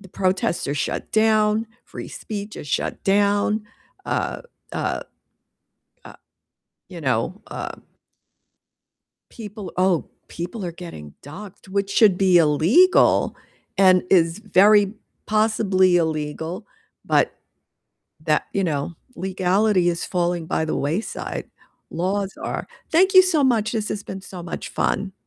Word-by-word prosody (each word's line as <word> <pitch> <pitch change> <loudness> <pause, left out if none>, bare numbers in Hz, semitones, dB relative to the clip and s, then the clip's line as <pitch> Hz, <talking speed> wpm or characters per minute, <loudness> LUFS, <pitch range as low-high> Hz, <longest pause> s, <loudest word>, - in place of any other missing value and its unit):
the 195 - -14
protests 185 -2 -1
are 140 - -1
shut 145 - -3
down, 215 0 +3 0.2
free - - -8
speech 210 -1 -7
is - - -8
shut - - -2
down, 205 +2 +2 0.4
uh - - -2 0.3
uh - - -2 1.0
uh, - - -12 0.7
you 180 -3 -9
know, 135 - -1
uh - - -5 1.6
people 210 -3 -8
Oh, 185 -3 +2 0.2
people 180 +4 -6
are 170 - -4
getting 160 - -10
doxxed, 190 +7 -11
which 200 0 -1
should 200 -4 +5
be 185 -2 +5
illegal, 170 - +4 0.4
and 185 -2 +5
is 170 0 +3
very 205 0 +4 0.3
possibly 210 -4 +3
illegal, 160 +4 -3 0.4
but - - +2 0.9
that 155 -2 +2
you 195 - 0
know, 155 -1 -2 0.2
legality 190 0 +1
is 170 -1 -2
falling 175 -2 -1
by 160 - -1
the - - -2
wayside, 165 +10 -3 0.4
laws 195 +3 -2
are. - - -4 0.2
Thank 375 +4 +4
you 375 - +11
so 325 -6 +2
much, 225 -4 +2
this 215 -2 -2
has 205 - -4
been 190 -1 -7
so 180 -3 -9
much 170 - -6
fun. 195 -1 -1
190 Hz, 125 wpm, -22 LUFS, 170-210 Hz, 1.6 s, you